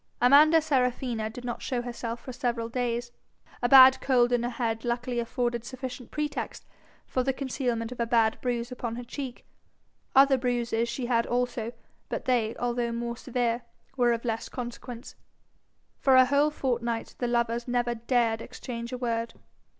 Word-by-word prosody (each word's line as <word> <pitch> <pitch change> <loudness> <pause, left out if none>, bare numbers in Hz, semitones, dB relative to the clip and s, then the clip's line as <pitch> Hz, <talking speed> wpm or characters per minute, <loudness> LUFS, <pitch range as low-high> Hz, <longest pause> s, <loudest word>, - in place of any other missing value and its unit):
Amanda 300 +6 +7
Serafina 250 -6 0
did 245 +2 -9
not 240 - -4
show 245 -2 -2
herself 235 -1 -5
for 255 - -8
several 235 -2 -2
days. 240 0 -2 0.5
A 245 - +1
bad 260 0 +9
cold 245 -2 +3
in 245 -1 +2
her 240 - -1
head 230 -2 -2
luckily 240 0 -1
afforded 240 0 -1
sufficient 255 0 -7
pretext 300 -1 -4 0.4
for 255 - -1
the 270 +2 +1
concealment 250 -4 -2
of 250 - -8
a 235 - 0
bad 225 -2 +2
bruise 240 -1 -2
upon 235 -2 -4
her 245 - -6
cheek. 255 0 -7 0.7
Other 270 0 +6
bruises 235 -2 0
she 240 +1 -3
had 235 -1 +1
also, 245 -1 -1 0.4
but - - -4
they, 235 -3 +1
although 240 -1 -1
more 235 0 -3
severe, 240 -1 -1 0.3
were 245 -2 +3
of 235 +1 -2
less 225 -1 -2
consequence. 240 -1 -7 0.9
For 265 -1 +4
a 260 0 +8
whole 285 +3 +3
fortnight 240 -5 -2
the 245 - 0
lovers 235 0 0
never 240 -1 0
dared 230 -1 +1
exchange 235 -1 -7
a 250 - -3
word. 230 -2 -2
240 Hz, 165 wpm, -28 LUFS, 235-255 Hz, 0.9 s, bad